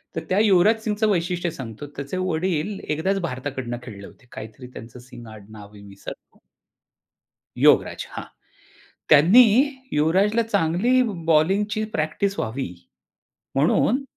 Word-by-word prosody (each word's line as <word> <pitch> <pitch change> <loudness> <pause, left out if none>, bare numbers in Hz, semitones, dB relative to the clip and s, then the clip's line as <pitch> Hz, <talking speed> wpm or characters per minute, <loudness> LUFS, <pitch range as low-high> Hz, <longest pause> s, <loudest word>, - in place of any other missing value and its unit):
तर - - -3
त्या 185 - +2
युवराज 210 +1 +4
सिंगचं 215 0 0
वैशिष्ट्य 175 -2 -1
सांगतो, 125 -1 -8
त्याचे 140 +5 -5
वडील 185 +1 -2
एकदाचं 190 +6 -1
भारताकडून 130 -5 -5
खेळले 100 -5 -10
होते. 125 - -20
काहीतरी 110 +4 -10
त्यांचं 115 +2 -11
सिंग 120 -1 -13
आडनाव 105 -1 -13
मी 105 - -14
विसरलो. 100 0 -12 1.2
योगराज, - - +3
हां! - - -6 0.9
त्यांनी 175 - +7 0.5
युवराजला 190 +9 +2
चांगली 215 +4 +1
ब 230 - -3
बॉलिंगची 195 +7 +1
प्रॅक्टिस 175 +6 -2
व्हावी 110 -4 -4 0.8
म्हणून, 200 - +2
160 Hz, 120 wpm, -23 LUFS, 125-200 Hz, 1.2 s, त्यांनी